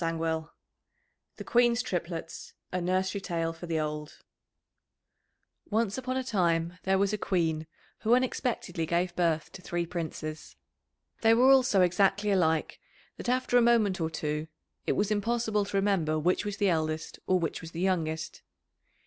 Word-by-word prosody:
[Illustration: 165 -1 -1 0.9
The - - -6
Queen's 240 -1 +3
Triplets, 170 -5 -5 0.2
a 180 - -1
Nursery 185 +2 0
Tale 165 -3 -2
for 165 +2 -9
the 165 -1 0
old] 150 -1 -4 1.5
Once 215 -1 +1
upon 255 0 -3
a 260 - -1
time 175 -6 0
there 190 0 +2
was 200 +1 +1
a 210 - -1
Queen 160 -5 0 0.3
who 230 +3 +4
unexpectedly 245 -9 -1
gave 175 +1 0
birth 165 -3 0
to 190 - -11
three 175 -1 -2
Princes. 160 -2 -5 0.7
They 225 0 +5
were 255 +3 +6
all 270 -1 +7
so 230 -7 +2
exactly 195 +3 +3
alike 160 -5 +1 0.4
that - - -4
after 250 -1 +3
a - - +4
moment 220 -6 +3
or 160 - 0
two 150 -1 -3 0.4
it - - +3
was 205 +1 0
impossible 215 0 0
to 200 - -2
remember 190 -6 +1
which 175 +6 +1
was 205 -1 -3
the 200 -1 +2
eldest 155 -2 -2
or 185 - +4
which 165 -3 -2
was 165 - -8
the 165 - -7
youngest. 160 -4 -1
180 Hz, 160 wpm, -29 LUFS, 165-210 Hz, 1.5 s, all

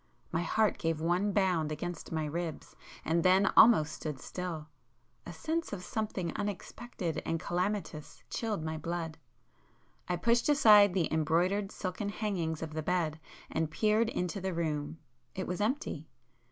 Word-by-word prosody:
My 165 - 0
heart 215 +4 +1
gave 165 -2 0
one 175 +5 +1
bound 180 -6 +1
against 175 +2 -5
my 160 -1 -1
ribs 165 +1 -5 0.3
and 165 +1 +2
then 185 +3 +4
almost 160 -10 +7
stood 150 -4 -5
still—a 150 -8 -8
sense 320 - -3
of 185 -3 -5
something 195 -4 -3
unexpected 200 -4 -4
and 165 - -1
calamitous 180 -3 -3
chilled 215 -8 -2
my 160 0 -3
blood. 165 0 -4 0.9
I 180 - +2
pushed 235 - +2
aside 210 -9 +7
the 175 -4 +2
embroidered 175 +6 +1
silken 195 +2 -3
hangings 180 -7 -2
of 155 -1 -6
the 155 - -2
bed 160 -2 0 0.3
and 160 -1 0
peered 215 +7 +2
into 180 0 -2
the 190 -2 -2
room,—it 150 -2 -4
was 180 +3 -3
empty. 255 +8 -2
175 Hz, 140 wpm, -31 LUFS, 160-205 Hz, 0.9 s, almost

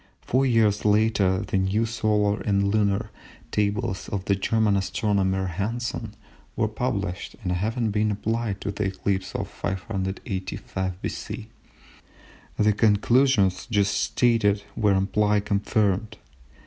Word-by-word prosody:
Four 135 +2 +2
years 110 -4 +3
later 105 -3 +3
the 95 - -1
new 100 +4 +1
solar 105 -2 +1
and 100 -1 +1
lunar 100 -2 +1 0.4
tables 100 -2 -1
of 95 -2 -3
the 100 - +2
German 105 +1 +2
astronomer 95 -1 0
Hansen 110 +4 -3 0.4
were 110 - +1
published, 100 -5 -3
and 90 - -1
having 110 +5 -1
been 105 +1 +1
applied 110 0 -2
to 100 - -2
the 100 +1 -2
eclipse 95 0 -2
of - - -2
585 95 -1 -4
B.C., - - -5 1.1
the 105 0 +3
conclusions 105 -2 +3
just 100 -3 +2
stated 110 -4 +2
were 105 -3 +3
amply 105 +2 +2
confirmed. 105 0 0
105 Hz, 120 wpm, -25 LUFS, 95-110 Hz, 1.1 s, years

